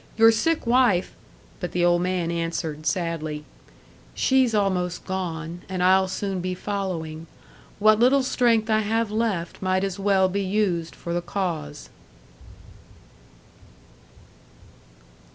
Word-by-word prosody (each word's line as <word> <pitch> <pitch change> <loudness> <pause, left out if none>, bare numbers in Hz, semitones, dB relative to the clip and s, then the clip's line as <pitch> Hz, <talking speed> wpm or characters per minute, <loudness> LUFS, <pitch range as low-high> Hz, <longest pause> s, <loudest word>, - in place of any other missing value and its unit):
"Your 225 0 +7
sick 320 +8 0
wife 235 -7 +3 0.2
" - - -28
But 180 - -5
the 175 0 +2
old 175 0 +3
man 180 -2 -1
answered, 165 -2 -3
sadly, 155 -2 -2 0.7
"She's 260 -4 +2
almost 185 -4 0
gone, 175 -2 -4
and 185 -1 -2
I'll 190 +1 +4
soon 195 0 -3
be 185 0 -3
following. 175 -5 -4 0.5
What 215 +1 +4
little 260 +3 +4
strength 235 -4 +2
I 215 - +4
have 220 +1 0
left 210 -7 -2
might 185 0 +1
as 195 0 -3
well 195 -1 +3
be 200 +2 -2
used 185 -4 -1
for 170 - -5
the 175 - 0
cause." 170 -5 -4
185 Hz, 125 wpm, -24 LUFS, 170-215 Hz, 0.7 s, Your